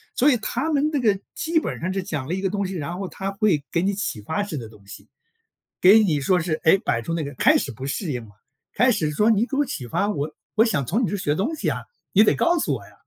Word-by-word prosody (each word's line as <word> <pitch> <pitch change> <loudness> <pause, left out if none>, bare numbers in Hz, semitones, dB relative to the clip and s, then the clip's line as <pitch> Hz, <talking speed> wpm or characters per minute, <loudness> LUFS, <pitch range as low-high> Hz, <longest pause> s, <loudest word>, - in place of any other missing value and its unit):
所 285 +4 +4
以 245 - +3
他 260 +8 -2
们 295 +1 +2
那 290 - 0
个 210 -5 +2 0.2
基 325 0 +1
本 - - -5
上 185 +3 -2
是 195 - -1
讲 155 -7 -4
了 170 - -2
一 190 - -2
个 195 - 0
东 200 0 -2
西， 190 - -4
然 170 +1 -4
后 195 -1 -4
他 195 +1 -5
会 195 -7 +1
给 170 +1 +1
你 200 +1 +1
启 190 - -3
发 160 - -2
式 200 -7 -4
的 115 -3 -7
东 100 -3 -19
西， 100 +1 -12 0.7
给 200 +5 +7
你 165 -9 +2
说 180 +6 +2
是， 165 -1 -2
诶， 175 +4 +5
摆 115 -8 -1
出 165 - -3
那 165 -2 -1
个 140 - -5
开 - - +4
始 135 - -4
不 130 +4 -8
适 155 +3 -3
应 120 -3 -4
了， 105 - -16 0.4
开 250 +1 +4
始 160 -9 0
说： 210 +9 +2
“你 225 +1 +3
给 275 - -5
我 290 - +3
启 125 - -5
发， 200 - 0
我 155 -6 -3 0.2
我 220 - +5
想 190 - 0
从 220 - 0
你 - - -1
这 - - -2
学 150 -6 -1
东 245 - -1
西 310 - -1
啊， - - -3 0.3
你 210 +3 +7
得 - - +4
告 345 0 +2
诉 - - 0
我 - - -5
呀。” - - -18
190 Hz, 310 characters per minute, -23 LUFS, 150-220 Hz, 0.7 s, 给